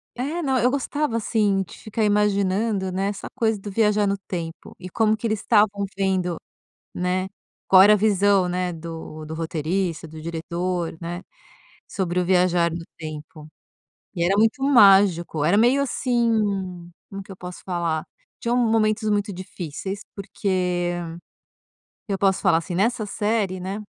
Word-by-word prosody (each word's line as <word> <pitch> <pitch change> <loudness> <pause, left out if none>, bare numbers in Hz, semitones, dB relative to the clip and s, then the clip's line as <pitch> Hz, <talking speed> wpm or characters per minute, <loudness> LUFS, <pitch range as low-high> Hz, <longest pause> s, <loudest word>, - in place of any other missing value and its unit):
É, 290 +8 -3
não, 270 -4 +1
eu 245 +2 +3
gostava 280 -1 -1
assim 210 -3 +1
de 175 - -13
ficar 215 +1 -3
imaginando, 205 -1 +1
né, 190 +2 -1
essa 200 -1 -5
coisa 225 -2 +1
do 205 +1 -7
viajar 210 0 +2
no 200 0 0
tempo 170 -4 -7
e 185 - -9
como 215 +3 +2
que 220 - -7
eles 215 -2 0
estavam 205 -2 +2
vendo, 190 -3 0 0.6
né, 180 +1 -1 0.4
qual 190 -1 +8
era 205 +2 +7
a - - +6
visão, 200 -2 +3
né, 180 0 -1
do 160 -1 -8
do 155 +1 -7
roteirista, 165 +1 -2
do 155 0 -10
diretor, 170 +1 -3
né, 175 +1 -5 0.7
sobre 180 -2 -1
o 180 - 0
viajar 180 -2 +3
no 165 +1 -5
tempo. 155 -1 -9 0.7
E 170 -2 0
era 190 +3 +2
muito 225 +5 +2
mágico. 195 - +5
Era 175 +6 +3
meio 245 +5 +4
assim, 240 -3 0 0.8
como 195 0 -6
que 195 - -17
eu - - -11
posso 180 0 -9
falar? 170 -4 -1 0.4
Tinham 235 +1 0
momentos 220 -2 +2
muito 205 0 0
difíceis 185 +1 -6
porque, 180 -3 -1 1.2
eu 195 - 0
posso 195 -1 +2
falar, 180 -5 +4
assim, 170 +2 -4
nessa 215 +3 +1
série, 205 -2 -1
né 195 +3 -4
195 Hz, 155 wpm, -23 LUFS, 175-215 Hz, 1.2 s, qual